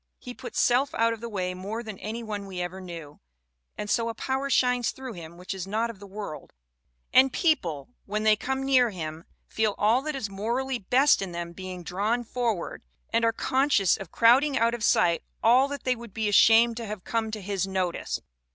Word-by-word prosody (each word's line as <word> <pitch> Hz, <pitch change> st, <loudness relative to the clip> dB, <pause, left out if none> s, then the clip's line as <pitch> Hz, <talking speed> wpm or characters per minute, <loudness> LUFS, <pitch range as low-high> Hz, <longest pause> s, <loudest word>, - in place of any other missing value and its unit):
He 250 Hz, -, -9 dB
puts -, -, -6 dB
self 260 Hz, +3 st, +2 dB
out 230 Hz, 0 st, +2 dB
of 225 Hz, -, -9 dB
the 235 Hz, -, -5 dB
way 185 Hz, -4 st, -2 dB
more 205 Hz, +6 st, -5 dB
than 215 Hz, -4 st, -8 dB
any 225 Hz, +3 st, -5 dB
one 205 Hz, -2 st, -5 dB
we 185 Hz, -2 st, -6 dB
ever 180 Hz, +2 st, -4 dB
knew, 165 Hz, -5 st, -9 dB, 0.6 s
and 210 Hz, -, -4 dB
so 230 Hz, +2 st, +1 dB
a 230 Hz, -, -5 dB
power 265 Hz, +4 st, -2 dB
shines 250 Hz, -2 st, +2 dB
through 260 Hz, -2 st, -7 dB
him 170 Hz, -2 st, -10 dB
which 180 Hz, +2 st, -5 dB
is 190 Hz, -1 st, -6 dB
not 225 Hz, +3 st, -1 dB
of 210 Hz, -, -17 dB
this 200 Hz, -1 st, -12 dB
world, 200 Hz, -6 st, -7 dB, 0.6 s
and 265 Hz, 0 st, +6 dB
people, 175 Hz, -, 0 dB, 0.2 s
when 210 Hz, +2 st, -2 dB
they 215 Hz, 0 st, +5 dB
come 265 Hz, +5 st, -3 dB
near 255 Hz, -3 st, +4 dB
him, 160 Hz, -4 st, -6 dB, 0.2 s
feel 220 Hz, -2 st, 0 dB
all 225 Hz, +5 st, +3 dB
that 305 Hz, +1 st, -4 dB
is 265 Hz, -6 st, -3 dB
morally 235 Hz, +6 st, -2 dB
best 260 Hz, +8 st, +4 dB
in 190 Hz, -3 st, -4 dB
them 170 Hz, 0 st, -5 dB
being 185 Hz, -1 st, -7 dB
drawn 210 Hz, +8 st, -1 dB
forward, 230 Hz, -6 st, -2 dB, 0.3 s
and 230 Hz, 0 st, +2 dB
are 230 Hz, -, +4 dB
conscious 230 Hz, -5 st, +2 dB
of 195 Hz, -4 st, -9 dB
crowding 265 Hz, +5 st, +4 dB
out 230 Hz, +1 st, +2 dB
of 240 Hz, -2 st, -4 dB
sight 170 Hz, -4 st, +3 dB, 0.2 s
all 250 Hz, +4 st, +5 dB
that 285 Hz, -1 st, -6 dB
they 255 Hz, -1 st, +1 dB
would 235 Hz, -4 st, -12 dB
be 220 Hz, -1 st, 0 dB
ashamed 225 Hz, +3 st, +5 dB
to 230 Hz, -2 st, -5 dB
have 205 Hz, -3 st, -6 dB
come 225 Hz, -1 st, -1 dB
to 215 Hz, 0 st, -5 dB
his 195 Hz, -1 st, -2 dB
notice." 185 Hz, -2 st, -2 dB
220 Hz, 210 wpm, -27 LUFS, 190-245 Hz, 0.6 s, and